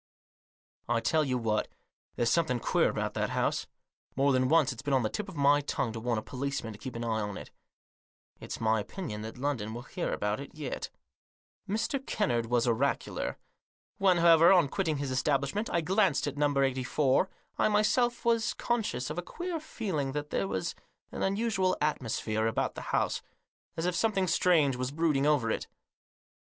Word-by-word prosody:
I 120 -1 +2
tell 155 +6 +2
you 130 -3 0
what; 110 -3 0 0.5
there's 115 -1 +1
something 145 -6 +2
queer - - +2
about - - -2
that - - -1
house. - - 0 0.5
More 140 +1 +3
than 130 0 +2
once 155 -2 +4
it's 115 - -9
been 145 -2 +1
on 130 - +2
the 110 - -1
tip 210 -1 -4
of 185 - -10
my 145 0 +4
tongue 130 -4 -2
to 115 - -5
warn 120 0 -1
a 110 - -3
policeman 130 -4 -4
to 105 - -13
keep 125 +2 -7
an 115 - -4
eye 110 -1 0
on 105 -1 -4
it. - - -10 0.9
It's - - -6
my 110 0 +2
opinion 105 - -5
that 110 +2 -7
London 125 -5 -2
will 120 - -6
hear 175 +5 -3
about 105 +2 -1
it 140 - -9
yet." 150 -4 -4 0.8
Mr. 225 +6 -1
Kennard 120 - 0
was 120 +1 +2
oracular. 125 +4 -1 0.6
When, 190 -2 +4
however, 170 0 +7
on 175 -7 +5
quitting 160 -4 -1
his 140 -1 -3
establishment 140 - 0
I 170 - +2
glanced 190 -1 +2
at 145 -1 -3
No. 145 -1 +1
84, 135 +5 +2 0.3
I - - +4
myself 235 +4 +2
was 230 -2 +2
conscious 220 - -1
of 160 - -3
a - - -1
queer 345 - -4
feeling 185 - -3
that 150 0 -4
there 95 - 0
was 95 -1 -2 0.4
an - - -6
unusual 195 -2 +1
atmosphere 115 -6 -1
about 115 - -1
the - - -7
house, - - 0 0.6
as 165 - -1
if 180 - +1
some 220 +5 +1
thing 190 -1 +1
strange 160 -7 +3
was 125 0 -2
brooding 150 -2 +1
over 135 -7 +2
it. - - -2
140 Hz, 185 wpm, -30 LUFS, 120-180 Hz, 0.9 s, however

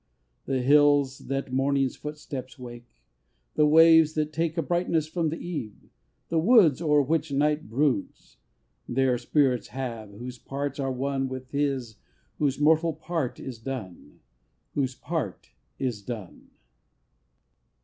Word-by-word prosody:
IV. - - -46
The 130 - +1
hills 145 -1 +4
that 135 -1 -3
Morning's 135 0 +1
footsteps 145 -3 -7
wake; 120 - -11 0.6
The 150 - +4
waves 160 0 +6
that 155 0 -1
take 165 +1 -1
A 165 - +1
brightness 170 -1 0
from 160 0 -1
the 165 - -4
Eve; 150 - -7 0.4
the 165 - +1
woods 175 - +5
O'er 150 -3 +3
which 155 +1 -1
Night 150 0 +1
broods, 130 -2 -1 0.5
Their 125 -1 +1
spirits 130 -2 +1
have, 120 -5 -5
whose 120 +4 -9
parts 140 0 -4
are 135 -1 -1
one 135 +1 -2
With 130 0 -7
his 135 -6 -1 0.4
whose 140 -2 0
mortal 160 +2 +3
part 160 -7 -3
is 125 -4 -7
done. 110 -8 -8 0.5
Whose 130 -3 -1
part 150 - -4 0.3
is 120 -6 -2
done! 105 -4 -8
140 Hz, 135 wpm, -26 LUFS, 125-155 Hz, 0.6 s, waves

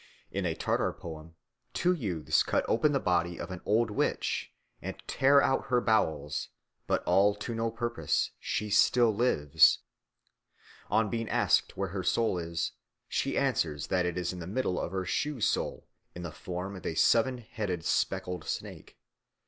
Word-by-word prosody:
In 95 -2 -1
a 80 - -1
Tartar - - 0
poem 80 0 -10 0.4
two 180 +1 +3
youths 95 - 0
cut - - 0
open 130 +6 +3
the 140 - +2
body 85 -3 0
of - - -6
an 90 - -6
old 110 +1 +2
witch - - -1 0.3
and - - -5
tear 140 +1 +4
out 135 - +1
her 125 -1 +3
bowels, 75 -11 0 0.4
but - - +1
all 100 +1 +4
to 105 +3 -5
no 115 0 -1
purpose, 120 +1 -1
she 105 -1 -2
still 115 +2 +4
lives. 80 - +4 1.1
On 110 -2 +2
being 115 -1 -2
asked - - +2
where 95 0 -1
her 95 +1 -3
soul 110 0 +1
is, 85 0 -2 0.4
she - - -1
answers 75 -3 0
that 90 -2 +1
it 90 - -3
is 90 0 -1
in 90 - -7
the 85 - -6
middle 100 -2 -1
of - - -3
her 95 -1 -2
shoe 150 - -1
sole - - -1 0.3
in 90 - -7
the 85 - -5
form 90 +6 -5
of 95 - -9
a 80 - -3
seven 120 - +3
headed 105 -7 -4
speckled 90 0 -1
snake. - - -6
95 Hz, 170 wpm, -30 LUFS, 85-115 Hz, 1.1 s, tear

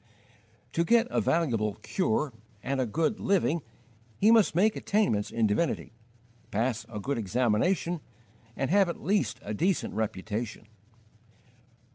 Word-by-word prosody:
To 170 - +2
get 235 +6 +4
a - - +1
valuable 115 -11 +1
"cure" 150 - 0 0.3
and 135 0 -1
a 125 - 0
good 165 - 0
"living" 175 -4 +1 0.6
he 215 +3 +5
must 220 -8 +4
make 210 +5 +3
attainments 195 - +1
in 115 -1 +1
divinity, 105 +8 0 0.6
pass 115 +2 -1
a 105 -2 -5
good 135 +4 -2
examination, 125 - +1 0.5
and 135 - -1
have 195 -2 +4
at 170 - -6
least 145 - +1
a 105 - -4
decent 175 - 0
reputation. 110 +1 -3
140 Hz, 130 wpm, -28 LUFS, 110-185 Hz, 0.6 s, he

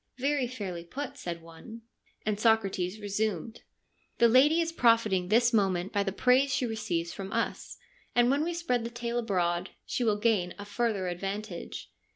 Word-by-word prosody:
' - - -49
Very 275 0 +1
fairly 195 -8 -5
put,' 260 +11 -6
said 170 -1 -6
one, 220 +8 -12 0.4
and 210 -1 -1
Socrates 210 -4 +1
resumed, 210 0 -2 0.3
' - - -42
The 235 - +6
lady 275 +8 +5
is 330 0 0
profiting 230 - +3
this 235 +4 +3
moment 195 -3 +1
by 200 - +2
the 195 -1 -1
praise 255 +6 +3
she 255 0 +1
receives 175 -7 -2
from 195 0 -7
us, - - -2 0.4
and 240 +1 +4
when 285 +2 +2
we 345 +1 -2
spread 250 -9 0
the 230 - -3
tale 235 0 -3
abroad 180 -5 0 0.2
she 250 - -2
will 215 -3 +2
gain 205 -5 +1
a 205 - -7
further 205 -3 -1
advantage. 195 +4 -5
220 Hz, 180 wpm, -29 LUFS, 190-240 Hz, 0.4 s, The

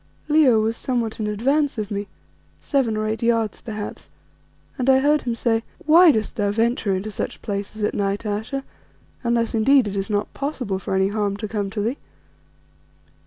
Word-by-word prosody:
Leo 295 -7 +5
was 220 +1 0
somewhat 235 -3 -2
in 215 - -1
advance 275 +7 +1
of 215 0 -3
me, 200 0 -3 0.5
seven 255 -7 0
or 215 - -1
eight 220 +1 -2
yards 230 -3 +1
perhaps, 215 -3 -7 0.7
and 255 +1 +1
I 265 - +7
heard 295 +3 +3
him 240 -2 -2
say 225 -1 +1 0.2
"Why 330 +2 +8
dost 220 -5 -2
thou 205 -1 +1
venture 225 -2 +1
into 200 +3 -4
such - - -4
places 205 +1 -4
at - - +1
night, 200 +1 -1
Ayesha, 220 +6 -3 0.6
unless 235 -1 +1
indeed 250 +2 +4
it 200 - -4
is 195 +2 -2
not 205 0 -1
possible 255 -9 -3
for 190 - -3
any 190 0 +2
harm 205 -1 -1
to 215 - -4
come 205 -2 -2
to 205 +1 -3
thee?" 235 +7 -1
220 Hz, 180 wpm, -22 LUFS, 205-250 Hz, 0.7 s, Why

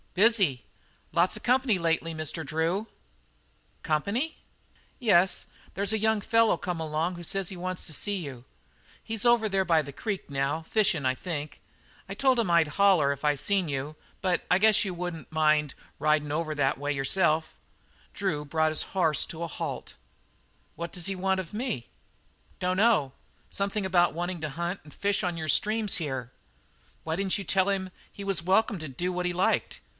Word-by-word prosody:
"Busy. 195 - +3 0.5
Lots 170 +5 +3
of - - -12
company 250 -4 +3
lately, 165 -1 0
Mr. 155 +1 -3
Drew." 165 +8 -1 0.9
"Company?" 205 - -1 0.6
"Yes, 190 -7 +3 0.3
there's 200 +2 0
a - - +2
young 220 0 +2
feller 225 +2 +3
come 175 -3 -3
along 160 +3 -1
who 175 - -8
says 195 +2 -1
he 190 - -5
wants 185 +1 -3
to 155 - -3
see 205 +6 0
you. 140 -9 -7 0.6
He's 225 -2 -4
over 240 -2 +4
there 195 -2 +1
by 165 -3 +3
the 140 -1 -9
creek 205 -7 -4
now, 140 +3 -1
fishin' 195 -6 +1
I 130 0 +2
think. 150 -2 -5 0.5
I - - -3
told 260 +3 +2
him 210 -7 +1
I'd 170 -2 +4
holler 180 -8 +5
if 140 - -12
I 150 -1 +3
seen 185 +4 +1
you, 140 +2 -3 0.3
but 185 -2 +1
I 180 - +6
guess 215 +1 +5
you 195 -3 -3
wouldn't 175 -2 -6
mind 155 -2 +2 0.2
ridin' 150 -1 +1
over 155 0 -1
that 135 -2 +1
way 145 +1 -1
yourself." 155 +3 +1 0.6
Drew 165 -7 -2
brought 155 +2 +1
his 155 - 0 0.2
horse 160 -5 +3
to 165 0 -6
a - - -2
halt. - - -5 0.8
"What 170 0 -5
does 175 -3 -4
he 195 0 -2
want 190 +1 0
of 180 -1 -6
me?" 220 - -3 0.7
"Dunno. 185 - +2 0.4
Something 200 0 -2
about 175 -3 +3
wanting 175 0 -3
to 155 - -2
hunt 170 +6 -3
and 150 - -15
fish 200 0 0
on 175 -2 -1
your 160 -1 -4
streams 215 +5 +2
here." 130 -6 -4 0.7
"Why 160 0 -2
didn't 195 +2 0
you 200 - -5
tell 190 +3 +2
him 190 -2 -1 0.2
he 200 - -8
was 195 -4 0
welcome 195 +2 +2
to 155 -2 -6
do 175 +8 -2
what 180 0 -1
he - - 0
liked? 180 +2 0
175 Hz, 180 wpm, -28 LUFS, 155-200 Hz, 0.9 s, I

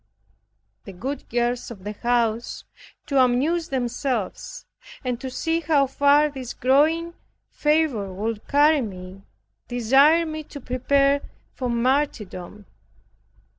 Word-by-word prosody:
The 195 - -9
good 265 +10 -6
girls 240 +1 -1
of 205 -6 -10
the 205 - -4
house, 235 +1 -1 0.4
to 275 -2 +1
amuse 285 +7 +1
themselves, 245 -4 -3 0.4
and 250 -1 -2
to 265 - -4
see 325 +5 -1
how 300 -3 +2
far 285 +2 +4
this 265 -4 -7
growing 315 +6 +2 0.4
fervor 295 -10 +1
would 210 +3 -4
carry 295 +1 +4
me, 190 -3 -8 0.5
desired 270 +8 +4
me 310 0 -5
to 285 - -9
prepare 275 +2 +1 0.3
for 250 -2 -3
martyrdom. 235 -6 -1
255 Hz, 115 wpm, -23 LUFS, 230-290 Hz, 0.5 s, far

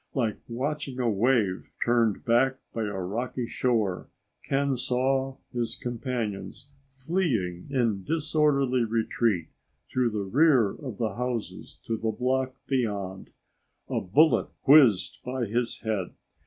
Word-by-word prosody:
Like 115 -6 0
watching 135 +2 -3
a 125 - +1
wave 110 -3 +1 0.2
turned 120 -1 +2
back 130 +2 +3 0.2
by 115 -1 -1
a 100 -2 -4
rocky 120 +7 -3
shore, 115 -6 0 0.3
Ken 140 0 +1
saw 130 +2 0 0.2
his 120 -2 -2
companions 120 +1 -4 0.2
fleeing 130 - -2
in 115 -8 0
disorderly 145 - +2
retreat 110 -5 0 0.4
through 125 -2 +2
the 105 -2 -3
rear 130 -2 +4
of 130 -9 -8
the 110 -4 -1
houses 125 -2 -4
to 115 - -1
the 110 +1 -1
block 130 +3 0
beyond. 100 -8 -2 0.6
A - - 0
bullet 150 - +4 0.2
whizzed 135 -10 +6
by 125 -1 -2
his 115 +3 -2
head. 105 -5 -2
120 Hz, 125 wpm, -27 LUFS, 110-135 Hz, 0.6 s, whizzed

